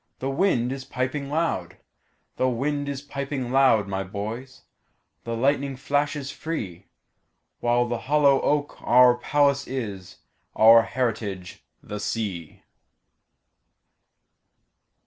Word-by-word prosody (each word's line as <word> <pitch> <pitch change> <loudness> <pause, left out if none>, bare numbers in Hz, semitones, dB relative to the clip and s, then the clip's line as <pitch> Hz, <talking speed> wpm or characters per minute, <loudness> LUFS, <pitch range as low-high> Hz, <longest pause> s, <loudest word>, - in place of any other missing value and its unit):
The 135 +1 -3
wind 135 -7 +1
is 135 0 -5
piping 135 +2 -3
loud; 100 - -2 0.6
The 130 - +2
wind 145 +4 -2
is 140 0 -5
piping 140 -3 -4
loud, 130 -6 +4
my 95 0 -2
boys, 115 +7 -7 0.6
The 115 0 -3
lightning 140 +2 +1
flashes 145 +1 -1
free—While 120 - -4
the 120 -1 -2
hollow 145 -2 +4
oak 145 0 -1
our 125 0 +6
palace 140 +1 +1
is, 100 -7 -6 0.4
Our 115 +1 +8
heritage 105 -7 -3 0.2
the 105 - -6
sea. 100 -7 -4
130 Hz, 105 wpm, -25 LUFS, 110-140 Hz, 0.6 s, Our